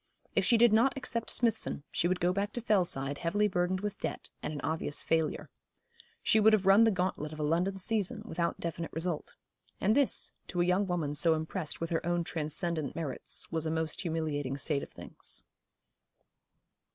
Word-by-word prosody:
If -, -, +3 dB
she 235 Hz, -, +4 dB
did 235 Hz, -1 st, +6 dB
not 245 Hz, +5 st, +4 dB
accept 235 Hz, -3 st, -2 dB
Smithson, 225 Hz, -, 0 dB
she 175 Hz, -, +1 dB
would 180 Hz, 0 st, 0 dB
go 175 Hz, +1 st, +2 dB
back 200 Hz, +2 st, -1 dB
to 240 Hz, -, -3 dB
Fellside 155 Hz, -, +1 dB
heavily 205 Hz, +5 st, +2 dB
burdened 185 Hz, 0 st, 0 dB
with 205 Hz, -1 st, -4 dB
debt, -, -, -4 dB
and -, -, -3 dB
an 150 Hz, -, -5 dB
obvious 160 Hz, 0 st, 0 dB
failure. 160 Hz, -2 st, 0 dB, 0.7 s
She 220 Hz, -, +4 dB
would 220 Hz, +1 st, +6 dB
have 200 Hz, -3 st, +3 dB
run 195 Hz, +4 st, +7 dB
the -, -, +5 dB
gauntlet 180 Hz, -6 st, -1 dB
of 155 Hz, -, -8 dB
a -, -, -1 dB
London 175 Hz, +6 st, +1 dB
season 215 Hz, +2 st, -1 dB
without 170 Hz, -5 st, -2 dB
definite 170 Hz, 0 st, -4 dB
result; 165 Hz, -1 st, -2 dB, 0.4 s
and 210 Hz, +3 st, +3 dB
this, 280 Hz, -2 st, +2 dB
to 175 Hz, -, -4 dB
a 175 Hz, -, +4 dB
young 185 Hz, +3 st, +2 dB
woman 165 Hz, -5 st, -1 dB
so 160 Hz, +2 st, +4 dB
impressed 160 Hz, +1 st, -4 dB
with 165 Hz, 0 st, -3 dB
her 165 Hz, -, 0 dB
own 175 Hz, 0 st, 0 dB
transcendent 160 Hz, -1 st, -2 dB
merits, 155 Hz, -6 st, -3 dB
was 160 Hz, -1 st, 0 dB
a -, -, 0 dB
most 160 Hz, -1 st, -1 dB
humiliating 155 Hz, -6 st, -2 dB
state 140 Hz, 0 st, 0 dB
of -, -, -8 dB
things. -, -, -9 dB
175 Hz, 190 wpm, -31 LUFS, 160-205 Hz, 0.7 s, run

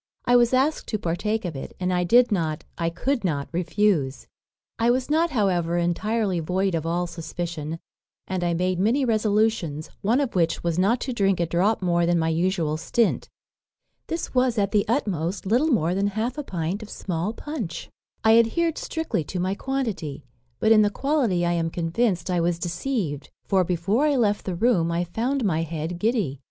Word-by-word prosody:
I 245 Hz, -, +4 dB
was 240 Hz, -1 st, +5 dB
asked 270 Hz, +4 st, +1 dB
to 215 Hz, -, -1 dB
partake 210 Hz, +4 st, -2 dB
of 170 Hz, -4 st, -4 dB
it, 135 Hz, -, -7 dB
and 180 Hz, 0 st, 0 dB
I 180 Hz, 0 st, +1 dB
did 240 Hz, +7 st, +5 dB
not, 160 Hz, -6 st, -1 dB
I 165 Hz, -1 st, -1 dB
could 245 Hz, +9 st, -1 dB
not 145 Hz, -6 st, -1 dB
refuse. 175 Hz, -5 st, 0 dB, 0.5 s
I 230 Hz, +1 st, +3 dB
was 255 Hz, +3 st, +1 dB
not, 330 Hz, +2 st, +3 dB
however, 180 Hz, -, +1 dB
entirely 190 Hz, +3 st, 0 dB
void 185 Hz, +4 st, 0 dB
of 165 Hz, -1 st, -1 dB
all 175 Hz, +2 st, 0 dB
suspicion, 165 Hz, -2 st, -5 dB, 0.5 s
and 185 Hz, -1 st, -2 dB
I 170 Hz, -1 st, +1 dB
made 180 Hz, +1 st, 0 dB
many 240 Hz, +8 st, +2 dB
resolutions; 215 Hz, -, 0 dB
one 230 Hz, +7 st, +2 dB
of 275 Hz, -4 st, -1 dB
which 170 Hz, -2 st, +1 dB
was, 170 Hz, 0 st, 0 dB
not 225 Hz, +6 st, +2 dB
to 260 Hz, -, -3 dB
drink 195 Hz, -5 st, +1 dB
a 170 Hz, -, +2 dB
drop 185 Hz, +6 st, +1 dB
more 170 Hz, -1 st, +2 dB
than 175 Hz, 0 st, +3 dB
my 160 Hz, -1 st, +1 dB
usual 165 Hz, -2 st, 0 dB
stint. 230 Hz, +7 st, 0 dB, 0.8 s
This 330 Hz, 0 st, -4 dB
was, 250 Hz, -2 st, +2 dB
at 200 Hz, -1 st, +1 dB
the 210 Hz, -2 st, +2 dB
utmost, 195 Hz, -, -1 dB
little 240 Hz, +10 st, +2 dB
more 175 Hz, -, +2 dB
than 195 Hz, +2 st, +1 dB
half 220 Hz, +5 st, -2 dB
a 295 Hz, -, -4 dB
pint 180 Hz, -, -3 dB
of 215 Hz, -, -9 dB
small 180 Hz, +2 st, -3 dB
punch. 235 Hz, -, -5 dB, 0.4 s
"I 225 Hz, +1 st, +6 dB
adhered 325 Hz, +8 st, +1 dB
strictly 320 Hz, -, -2 dB
to 180 Hz, -, -4 dB
my 185 Hz, +2 st, 0 dB
quantity; 200 Hz, -, -3 dB, 0.3 s
but 220 Hz, -, +3 dB
in 215 Hz, -1 st, +7 dB
the 205 Hz, -, +4 dB
quality 240 Hz, -, 0 dB
I 175 Hz, -, +1 dB
am 165 Hz, -1 st, 0 dB
convinced 175 Hz, +2 st, -1 dB
I 175 Hz, -1 st, +1 dB
was 170 Hz, 0 st, +1 dB
deceived; 175 Hz, -, -3 dB, 0.2 s
for 190 Hz, -2 st, +3 dB
before 185 Hz, -, +1 dB
I 290 Hz, -, +2 dB
left 210 Hz, -5 st, +1 dB
the 185 Hz, -, -2 dB
room 180 Hz, -5 st, +2 dB
I 170 Hz, +1 st, 0 dB
found 235 Hz, +8 st, -1 dB
my 165 Hz, -5 st, +1 dB
head 165 Hz, +1 st, -4 dB
giddy. 210 Hz, -, 0 dB
190 Hz, 190 wpm, -24 LUFS, 170-230 Hz, 0.8 s, in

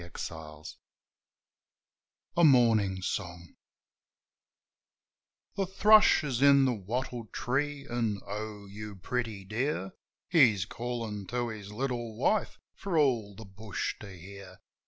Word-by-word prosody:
A -, -, -8 dB
MORNING 85 Hz, -, -8 dB
SONG 75 Hz, -4 st, -8 dB, 1.6 s
A 170 Hz, -, +5 dB
Morning 115 Hz, -, +4 dB
Song 85 Hz, -2 st, -5 dB, 2.0 s
THE 195 Hz, -1 st, -1 dB
thrush 210 Hz, -1 st, +6 dB
is 130 Hz, -4 st, -2 dB
in 140 Hz, -1 st, +6 dB
the 130 Hz, -, +2 dB
wattle 120 Hz, +3 st, -4 dB
tree, 140 Hz, +5 st, -2 dB
an', 115 Hz, -4 st, -1 dB
"O, 105 Hz, 0 st, -6 dB
you 105 Hz, +1 st, -8 dB
pretty 105 Hz, 0 st, -4 dB
dear 105 Hz, -2 st, -2 dB, 0.2 s
!" -, -, -65 dB
He's 120 Hz, -, +4 dB
callin' 110 Hz, -2 st, -5 dB
to 120 Hz, -1 st, -2 dB
his 105 Hz, -2 st, -8 dB
little 120 Hz, -1 st, -3 dB
wife 210 Hz, -, +1 dB, 0.2 s
for 190 Hz, -4 st, -3 dB
all 120 Hz, -9 st, +2 dB
the 110 Hz, -, -10 dB
bush 100 Hz, +1 st, -4 dB
to 105 Hz, -, -10 dB
hear. 95 Hz, +1 st, -11 dB
110 Hz, 125 wpm, -30 LUFS, 100-130 Hz, 2.0 s, thrush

